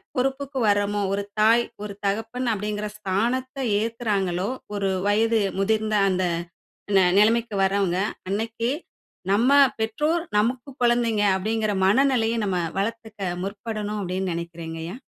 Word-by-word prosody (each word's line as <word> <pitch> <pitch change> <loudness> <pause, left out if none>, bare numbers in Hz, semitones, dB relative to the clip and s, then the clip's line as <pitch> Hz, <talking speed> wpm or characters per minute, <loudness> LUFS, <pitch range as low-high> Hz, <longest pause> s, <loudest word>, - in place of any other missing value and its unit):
பொறுப்புக்கு 270 +1 -1
வர்றமோ, 205 0 +2
"ஒரு 200 +1 -1 0.2
தாய், 230 +2 +5 0.2
ஒரு 205 -1 -5
தகப்பன்" 225 +5 -2
அப்டிங்கிற 210 +1 -3
ஸ்தானத்தை 240 +7 -1 0.2
ஏற்குறாங்களோ, 205 -5 -1 0.3
ஒரு 195 -1 0 0.2
வயது 225 +2 +3 0.2
முதிர்ந்த 215 +1 +1
அந்த 185 0 +1 0.7
ந - - +7 0.2
நிலைமைக்கு 225 +1 +3
வர்றவங்க. 190 -2 +1 0.3
அன்னைக்கு 225 +3 -1 0.6
"நம்ம 230 +6 +3 0.3
பெற்றோர் 300 +10 0
நமக்கு 245 +5 0
கொழந்தைங்க" 235 -3 +2
அப்டிங்கிற 215 +1 -1
மனநெலைய 235 0 +3
நம்ம 185 -2 0 0.2
வளர்த்துக்க 215 -2 -3
முற்படணும் 210 +1 -4
அப்டின் 185 0 -2
நெனைக்கிறேங்க 165 -1 -6
ஐயா! 185 +8 -6
215 Hz, 115 wpm, -24 LUFS, 200-230 Hz, 0.7 s, ந